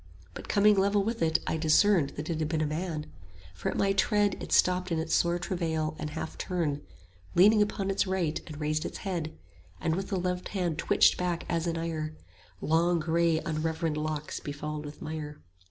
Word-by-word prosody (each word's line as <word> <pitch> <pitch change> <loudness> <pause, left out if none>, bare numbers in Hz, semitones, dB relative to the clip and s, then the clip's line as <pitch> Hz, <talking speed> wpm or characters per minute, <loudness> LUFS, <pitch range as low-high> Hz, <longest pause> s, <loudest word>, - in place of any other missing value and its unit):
But - - -9
coming 210 +1 +5
level 200 +1 +3
with 225 +2 -2
it 160 -1 +3
I - - -1
discerned 160 0 +4
That 150 +1 -5
it 165 -2 -2
had 155 - 0
been 160 -1 0
a 155 - +1
man; 155 0 -3 0.5
for 90 - -3
at - - -3
my 195 0 +2
tread 205 +1 +3
20 - - -7
It - - -8
stopped 180 0 +3
in 165 - +1
its 160 +1 -2
sore 170 0 +3
travail 160 -4 -2
and 155 - -3
half 160 +1 -6
turned, 165 -6 -1 0.5
Leaning 210 +4 +6
upon 195 -1 0
its 195 - +1
right, 180 -5 -1
and 155 -2 -8
raised 155 0 0
its - - -5
head, 170 -5 -3 0.4
And 160 - 0
with 190 +1 -3
the 195 - 0
left 180 0 -2
hand 175 -4 -1
twitched - - +4
back 175 -1 -1
as 170 0 -1
in 165 -1 -1
ire 160 -2 -3 0.5
Long 170 +2 +2
grey 165 0 +2
unreverend 160 0 -1
locks 150 0 -3
befouled 150 +1 -5
with 145 0 -9
mire. 150 -1 -5
165 Hz, 200 wpm, -29 LUFS, 155-185 Hz, 0.5 s, Leaning